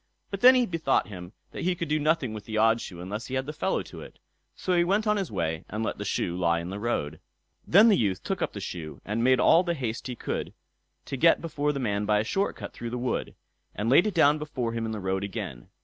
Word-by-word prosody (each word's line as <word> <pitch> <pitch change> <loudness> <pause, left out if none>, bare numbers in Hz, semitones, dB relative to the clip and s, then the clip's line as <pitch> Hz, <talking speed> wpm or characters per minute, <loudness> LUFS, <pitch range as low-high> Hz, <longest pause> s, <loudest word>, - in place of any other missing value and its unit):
But 195 -1 -4
then 255 +1 +9
he 250 -1 +3
bethought 160 - 0
him 90 -1 -9 0.2
that - - -6
he 180 +1 +1
could 170 - -4
do 155 +1 +1
nothing 150 -6 +1
with 105 -1 -8
the 110 0 -4
odd 115 +1 +4
shoe 85 - -8
unless 105 +6 -5
he 130 - -4
had 130 0 -1
the 150 - -5
fellow 190 +5 -1
to - - -11
it; - - -12 0.4
so 185 - -1
he 175 -1 +4
went 200 +5 +1
on 210 0 +3
his 195 - -2
way 80 -5 -2
and 110 +2 -3
let - - -3
the - - -4
shoe 85 - -1
lie 85 -2 +1
on 85 +2 -6
the 100 - -5
road. 80 -9 -2 0.5
Then 205 +6 +7
the 215 - +6
youth 100 - 0
took - - -3
up - - -1
the - - -6
shoe, 80 -5 -6
and 110 +3 -1
made 130 +1 +4
all 170 - +6
the 170 -2 -1
haste 125 -3 -4
he 125 - -5
could - - -4 0.5
to 135 - -4
get 165 +5 +5
before 150 -3 -1
the 140 - -4
man 105 -4 -1
by 105 -1 +3
a 105 - +1
short 195 - -1
cut - - -8
through 120 - -6
the 125 - -4
wood, 125 +1 -2 0.4
and 110 +4 -1
laid 175 +9 +6
it 205 - -3
down 150 -2 +5
before 130 -6 -3
him 115 -1 -2
in - - -3
the 110 - -4
road 95 0 -1
again. 95 -11 -6
120 Hz, 270 wpm, -27 LUFS, 100-165 Hz, 0.5 s, then